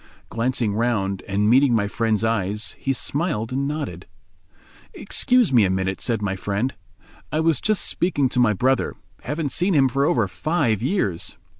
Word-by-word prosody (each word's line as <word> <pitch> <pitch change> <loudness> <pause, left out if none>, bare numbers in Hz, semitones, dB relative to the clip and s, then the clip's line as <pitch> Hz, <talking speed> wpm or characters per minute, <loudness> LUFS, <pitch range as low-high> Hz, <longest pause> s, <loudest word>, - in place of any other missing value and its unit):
Glancing 115 -2 -1
round, 100 -4 -1
and 100 +1 0
meeting 130 +2 +4
my 100 -2 +1
friend's 110 0 0
eyes, 105 -1 -1
he 135 - -1
smiled 135 -4 -1
and 135 +2 -1
nodded. 150 0 -5 0.9
"Excuse 250 - +2
me 115 -4 +6
a 95 - +2
minute," 95 +1 -2
said 115 -4 -1
my 95 -1 -1
friend, 100 +7 -2 0.6
"I 155 - 0
must 160 -4 +1
just 215 -3 +1
speak 180 +1 -1 0.2
to - - 0
my 120 -3 +4
brother—haven't 135 - -2
seen 180 +5 +1
him 135 -2 +5
for 135 +2 0
over 115 -8 +2
five 140 - -1
years." 125 - -2
120 Hz, 160 wpm, -22 LUFS, 105-145 Hz, 0.9 s, me